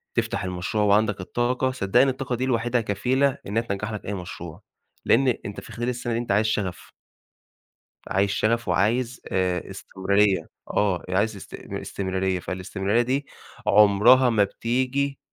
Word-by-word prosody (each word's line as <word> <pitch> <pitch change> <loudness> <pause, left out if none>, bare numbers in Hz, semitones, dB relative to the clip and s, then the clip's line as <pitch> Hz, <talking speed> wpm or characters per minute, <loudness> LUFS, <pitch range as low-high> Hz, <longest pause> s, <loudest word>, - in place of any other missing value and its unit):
تفتح - - -1
المشروع 90 +3 -2
وعندَك 105 -1 +2
الطاقة، 125 +6 0
صدّقني 125 +3 +3
الطاقة 130 -1 -3
دي 130 +2 -1
لوحدها 120 -1 +1
كفيلة 130 +7 +1
إنّها 110 +3 0
تنجَّح 105 -1 -4
لك 105 - -6
أي 105 - -3
مشروع. 85 -3 -7 0.4
لإن 135 +4 +4 0.2
أنت 100 - -6
في - - -13
خلال 120 +1 -3
السَنة 120 -1 -3
دي 115 - 0
أنت 120 -4 -3
عايز 105 +2 +3
شَغَف. 100 -4 -2 1.2
عايز 100 +1 +1
شَغَف 110 +4 0
وعايز 115 +7 +1
آآ 90 -1 0
استمرارية، 95 +1 0 0.2
آه، 95 -4 +1
عايز 100 +4 +1
است 100 - -11
استمرارية، 95 -1 -3
فالاستمرارية 95 +5 -1
دي 130 +4 -1 0.4
عمرها 105 +5 +6
ما 110 -3 +3
بتيجي 130 +6 -1
105 Hz, 145 wpm, -24 LUFS, 95-120 Hz, 1.2 s, عمرها